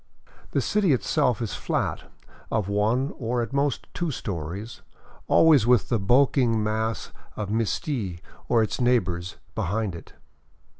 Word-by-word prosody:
The - - 0
city 200 -7 +2
itself 125 -3 +1
is 110 - -4
flat, - - -2 0.4
of 105 -4 0
one, 110 +7 +1
or 120 0 -1
at 115 - -7
most 140 -1 0
two 175 -2 -2
stories, 100 - -5 0.5
always 150 -8 +5
with 125 -4 +4
the 115 - +1
bulking 120 +1 +3
mass 110 -2 -2 0.2
of 105 -2 -4
Misti 110 - -1 0.3
or 115 -2 +4
its 110 - -3
neighbors 90 -8 +1 0.2
behind 105 +1 -1
it. 85 - -11
115 Hz, 135 wpm, -25 LUFS, 105-125 Hz, 0.5 s, always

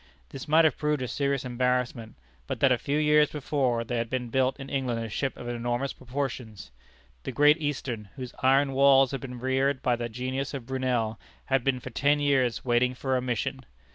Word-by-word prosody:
This 135 - -8
might 160 +2 +5
have 155 - +1
proved 150 -3 0
a - - -3
serious 140 0 -1
embarrassment, 125 -2 -1 0.3
but - - -4
that 135 - +4
a 125 - +3
few 145 +1 -1
years 150 0 +4
before 135 -5 -1
there 120 +1 -2
had 115 -1 -3
been 125 -1 -3
built 130 +3 +1
in 135 - -7
England 125 -4 -2
a - - -6
ship 135 +5 -2
of 120 - -8
enormous 120 +3 -2
proportions. 120 - -5 0.5
The - - -5
Great 150 +2 +4
Eastern, 125 -8 -3
whose 130 -2 -7
iron 135 +2 +3
walls 135 -1 +5
had 135 - -4
been 125 -2 -7
reared 130 +2 0
by 125 - +2
the 120 0 -4
genius 130 +4 -3
of 130 -4 -6
Brunel, 125 -4 -1 0.3
had 135 -2 +1
been 130 -1 +1
for - - -8
ten 145 +2 +2
years 135 -5 +1
waiting 125 +1 +2
for 130 +1 -1
"a 125 - +1
mission." 130 +2 -2
130 Hz, 200 wpm, -27 LUFS, 120-140 Hz, 0.5 s, might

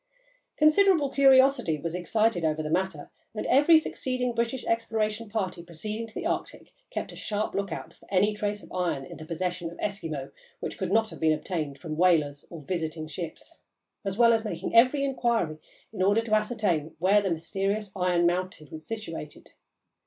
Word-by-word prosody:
Considerable 310 -1 +4
curiosity 265 - +5
was 165 +2 -4
excited 180 +1 +1
over 155 0 0
the 155 - -4
matter, 175 -4 -1 0.2
and - - -3
every 295 +4 +6
succeeding 255 -5 -1
British 235 +2 -1
exploration 225 -1 -1
party 195 -5 -2
proceeding 210 +7 -5
to 220 - -15
the - - -4
Arctic - - -3 0.2
kept - - -4
a - - -11
sharp 210 0 -2
lookout 175 -4 -4
for - - -22
any 200 +2 +3
trace 210 0 -3
of - - -14
iron 175 -7 -1
in - - -10
the 155 - -10
possession 175 0 -3
of 170 - -12
Eskimo 160 -9 -4 0.3
which - - -5
could 190 -1 -2
not 220 +1 +2
have - - -10
been 160 -1 +3
obtained 155 -3 -3
from 155 +2 -6
whalers 155 -5 +2
or 165 -3 -9
visiting 160 0 -3
ships, 175 - -8 0.4
as 195 0 -3
well 235 -1 +6
as 225 -1 +1
making 220 - -4
every 255 +5 +6
inquiry 235 - 0 0.3
in 195 - -4
order 205 +4 +4
to 225 -1 -4
ascertain 210 -8 0
where 195 +5 +4
the 195 - -1
mysterious 195 +5 -2
iron 180 -2 +2
mountain 175 -3 -1
was 155 0 -8
situated. 165 -9 -7
195 Hz, 175 wpm, -27 LUFS, 165-225 Hz, 0.4 s, every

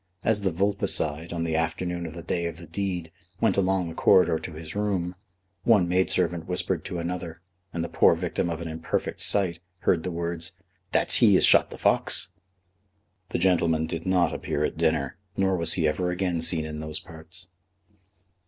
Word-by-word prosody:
As 110 -2 +1
the 100 - +1
vulpicide, 85 -4 0
on 85 -1 -2
the 80 -1 -1
afternoon 85 +2 -2
of 80 - -9
the 85 - -8
day 85 0 -2
of 85 -1 -7
the 85 - -10
deed, 90 -1 -4 0.3
went 110 -4 +2
along 95 -2 +1
the 80 - -6
corridor 80 -3 +4
to 85 - -8
his 80 0 -8
room, 95 -4 -1 0.5
one 105 -7 +4
maid 90 +1 +1
servant 85 -2 0
whispered 90 0 -1
to 90 - -4
another, 85 -1 -5 0.3
and 85 - -3
the - - -3
poor 85 0 +4
victim 85 0 -2
of 85 0 -4
an 85 - -5
imperfect 80 0 -3
sight 90 -5 +3 0.2
heard 85 - +2
the 90 - -4
words 85 -1 -3 0.4
"That's - - +5
he - - +6
as - - +5
shot - - +5
the - - -9
fox!" - - +2 1.0
The - - -1
gentleman 85 -3 +2
did 80 +2 -5
not 90 -2 +2
appear 75 - -2
at - - -3
dinner, 80 -4 0 0.2
nor 95 -1 +2
was 85 -2 +4
he 80 -4 +2
ever 90 +4 -1
again 90 -2 -1
seen 80 -1 +2
in 75 0 -6
those 75 0 -3
parts. 80 +3 -9
85 Hz, 190 wpm, -26 LUFS, 80-90 Hz, 1.0 s, he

